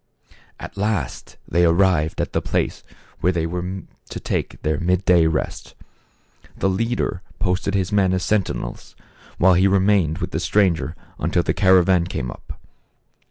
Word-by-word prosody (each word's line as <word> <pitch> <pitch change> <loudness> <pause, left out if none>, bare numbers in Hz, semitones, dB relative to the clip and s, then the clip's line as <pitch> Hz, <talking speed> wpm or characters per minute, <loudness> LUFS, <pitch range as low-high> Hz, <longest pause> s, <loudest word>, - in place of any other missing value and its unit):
At - - -9
last 100 - -3
they 85 +2 +2
arrived 85 -2 +2
at - - -4
the - - +1
place - - -2 0.4
where 90 - +2
they 85 -3 -1
were 90 +2 -4 0.3
to - - -6
take - - -3
their 75 -1 0
mid 90 +2 0
day 85 -3 +5
rest. 80 -1 -3 0.8
The 95 - +1
leader 110 -2 -1 0.2
posted 95 +1 -1
his 95 -2 0
men 100 -3 +3
as 95 0 0
sentinels, 105 -3 -2 0.4
while 95 +1 +5
he 95 +2 +4
remained 95 -4 +2
with 90 -1 -4
the 80 - -1
stranger 85 -4 +1 0.2
until 85 +3 +1
the - - 0
caravan 95 -2 +4
came 65 -8 -4
up. - - -11
90 Hz, 155 wpm, -21 LUFS, 85-95 Hz, 0.8 s, day